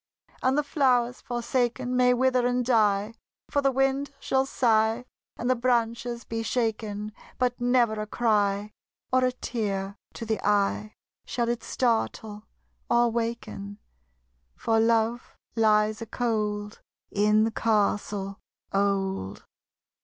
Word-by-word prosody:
And 260 +2 +2
the 295 - +2
flowers, 250 -4 +1
forsaken, 245 +1 -1
May 250 0 +4
wither 255 -1 +2
and 245 0 0
die: 215 -3 +2 0.4
For 285 - +2
the 275 -1 +3
wind 270 +1 +1
shall 265 -1 +1
sigh, 225 -1 +2 0.3
And 240 - -3
the 255 - +3
branches 235 -1 0
be 225 0 -4
shaken; 215 -2 -2 0.3
But 250 -1 0
never 245 -2 +3
a 215 - -5
cry. 210 -2 +1 0.4
Or 255 0 +4
a 255 - +3
tear 200 -6 -3 0.2
to 230 - -6
the 220 -1 -2
eye, 205 +1 +1 0.3
Shall 235 -1 -1
it 240 0 -1
startle 220 -3 -1 0.4
or 240 0 +4
waken: 230 -3 -4 0.8
For 225 -1 +1
Love 230 +1 +1 0.2
lies 215 -1 +3
a 230 - -5
cold 210 -3 -2 0.3
In 210 +1 +3
the 225 - +1
castle 205 -2 0 0.3
old. 195 - -1
230 Hz, 125 wpm, -27 LUFS, 210-245 Hz, 0.8 s, May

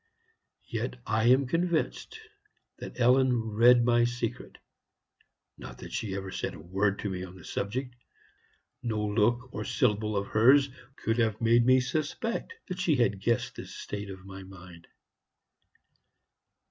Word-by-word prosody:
Yet - - -3
I 110 +2 +1
am 130 +3 +5
convinced 170 - -1 0.6
that - - -8
Ellen 130 +1 +4 0.2
read 120 +2 +6
my 120 0 +4
secret. 120 -1 -3 1.0
Not - - -9
that - - -10
she 100 -4 -3
ever 95 -1 -5
said - - -4
a - - -11
word 95 +5 0
to 105 - -3
me 90 -1 -4
on 95 0 -9
the 90 - -13
subject; 125 +5 -3 0.9
no 110 -3 -1
look 120 +4 +1
or 110 - -3
syllable 105 -3 0
of 100 - -1
hers 135 +6 +5 0.3
could 115 +1 -1
have 110 -2 +1
made 115 +1 +4
me 130 0 +6
suspect 155 - -3
that 180 -1 -5
she 175 -5 +2
had 105 -6 +1
guessed 115 +3 0
the - - -7
state 105 -1 -6
of 95 -1 -9
my 95 0 -9
mind. 90 -3 -13
115 Hz, 145 wpm, -29 LUFS, 100-125 Hz, 1.0 s, read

